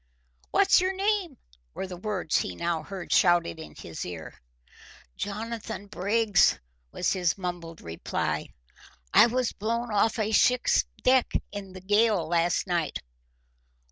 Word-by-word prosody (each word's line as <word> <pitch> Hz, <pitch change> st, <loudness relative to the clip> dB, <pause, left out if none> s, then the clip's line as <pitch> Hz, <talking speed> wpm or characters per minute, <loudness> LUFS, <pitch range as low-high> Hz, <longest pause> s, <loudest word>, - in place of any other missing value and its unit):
"What's 390 Hz, -2 st, +5 dB
your 375 Hz, +1 st, 0 dB
name?" 390 Hz, -, 0 dB, 0.4 s
were -, -, -3 dB
the 185 Hz, -1 st, -7 dB
words 185 Hz, -3 st, -1 dB
he 90 Hz, -, -2 dB
now 165 Hz, -, -1 dB
heard 185 Hz, +2 st, -5 dB
shouted 175 Hz, -2 st, +3 dB
in 160 Hz, -, -10 dB
his 80 Hz, -, -7 dB
ear. 85 Hz, -3 st, -7 dB, 0.8 s
"Jonathan 220 Hz, 0 st, -5 dB
Briggs," 205 Hz, +1 st, +2 dB, 0.3 s
was 180 Hz, -, 0 dB
his 180 Hz, -2 st, 0 dB
mumbled 175 Hz, -3 st, -6 dB
reply. 85 Hz, 0 st, -3 dB, 0.7 s
"I -, -, +8 dB
was 250 Hz, 0 st, -1 dB
blown 230 Hz, +2 st, -2 dB
off 220 Hz, +4 st, +2 dB
a 215 Hz, -1 st, 0 dB
ship's 250 Hz, +3 st, +3 dB, 0.2 s
deck 255 Hz, -1 st, +4 dB, 0.2 s
in 200 Hz, -2 st, -7 dB
the 185 Hz, -, -9 dB
gale 205 Hz, -3 st, +2 dB
last 170 Hz, +1 st, +1 dB
night." 175 Hz, -5 st, -1 dB
200 Hz, 135 wpm, -27 LUFS, 175-230 Hz, 0.8 s, I